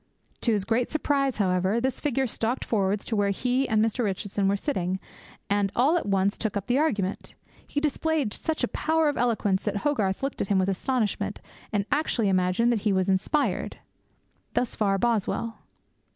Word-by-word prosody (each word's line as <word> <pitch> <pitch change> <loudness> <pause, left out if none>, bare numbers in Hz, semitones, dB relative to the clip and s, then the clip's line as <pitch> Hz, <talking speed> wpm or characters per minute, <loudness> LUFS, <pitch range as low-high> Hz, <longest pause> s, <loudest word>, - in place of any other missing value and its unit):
To 235 - +2
his 205 -3 0
great 235 +3 +1
surprise, 280 -3 0
however, 190 +2 +1
this 260 +2 -1
figure 270 -2 0
stalked 235 +1 -2
forwards 200 -2 0
to 225 - -2
where 205 -1 +2
he 250 +6 0
and 220 0 +3
Mr. 225 +2 -1
Richardson 200 0 -1
were 200 +1 +2
sitting, 190 - -2 0.5
and 200 -1 +1
all 275 +8 +4
at 340 - -1
once 195 +1 +1
took 215 -2 -1
up 200 - -4
the 250 +5 +2
argument. 210 -11 -1 0.3
He 290 - -1
displayed 300 -4 0
such 320 -1 -2
a - - +3
power 320 -1 +1
of 290 - -2
eloquence 215 -5 +1
that 205 -1 0
Hogarth 215 -8 0
looked 275 - -2
at - - -1
him 200 - +2
with 190 +1 +2
astonishment, 220 +3 -1 0.3
and 205 -3 0
actually 275 -8 +1
imagined 185 +5 +2
that 230 - +1
he 210 0 +1
was 190 0 +1
inspired.' 195 - 0 0.8
Thus 250 - 0
far 200 -2 +1
Boswell. 230 +1 -1
220 Hz, 180 wpm, -26 LUFS, 195-265 Hz, 0.8 s, all